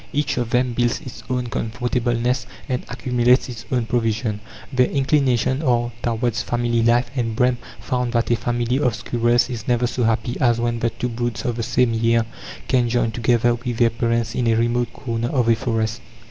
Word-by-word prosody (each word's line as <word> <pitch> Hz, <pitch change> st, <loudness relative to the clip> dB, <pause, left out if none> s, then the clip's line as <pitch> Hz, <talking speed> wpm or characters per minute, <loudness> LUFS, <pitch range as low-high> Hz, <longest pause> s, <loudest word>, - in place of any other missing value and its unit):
Each 145 Hz, 0 st, 0 dB
of 120 Hz, -2 st, -1 dB
them 125 Hz, +1 st, +1 dB
builds 120 Hz, 0 st, +1 dB
its 130 Hz, -5 st, -9 dB
own 125 Hz, -1 st, -1 dB
comfortable 120 Hz, +1 st, -1 dB
nest, 120 Hz, +1 st, 0 dB, 0.2 s
and 125 Hz, -1 st, -2 dB
accumulates 125 Hz, 0 st, +2 dB
its 120 Hz, -2 st, -8 dB
own 125 Hz, -3 st, +1 dB
provision. 115 Hz, -2 st, -1 dB, 0.3 s
Their 125 Hz, -1 st, +4 dB
inclinations 135 Hz, -1 st, +1 dB
are 120 Hz, -3 st, +1 dB
towards 120 Hz, 0 st, 0 dB
family 120 Hz, -1 st, 0 dB
life, 120 Hz, +1 st, +2 dB
and 115 Hz, -4 st, -1 dB
Brehm 125 Hz, +1 st, +2 dB, 0.2 s
found 125 Hz, -1 st, -2 dB
that 115 Hz, 0 st, +1 dB
a -, -, +5 dB
family 120 Hz, +2 st, -1 dB
of 125 Hz, -6 st, +1 dB
squirrels 120 Hz, +1 st, +1 dB
is 120 Hz, -4 st, -6 dB
never 120 Hz, -1 st, +2 dB
so 125 Hz, +1 st, -2 dB
happy 115 Hz, +2 st, 0 dB
as 120 Hz, -3 st, +3 dB
when 120 Hz, 0 st, -1 dB
the 115 Hz, -, +1 dB
two 120 Hz, +2 st, -4 dB
broods 120 Hz, +2 st, -3 dB
of 120 Hz, -2 st, 0 dB
the -, -, -1 dB
same 120 Hz, +1 st, +2 dB
year 115 Hz, 0 st, +2 dB, 0.4 s
can 125 Hz, -2 st, +2 dB
join 115 Hz, -1 st, +1 dB
together 120 Hz, +1 st, +2 dB
with 120 Hz, 0 st, -4 dB
their 115 Hz, -1 st, +4 dB
parents 115 Hz, 0 st, 0 dB
in 120 Hz, -1 st, 0 dB
a 115 Hz, -, +3 dB
remote 120 Hz, +1 st, +1 dB
corner 115 Hz, -3 st, -3 dB
of 125 Hz, -4 st, +1 dB
a 115 Hz, -, +5 dB
forest. 110 Hz, -1 st, -2 dB
120 Hz, 195 wpm, -21 LUFS, 115-125 Hz, 0.4 s, a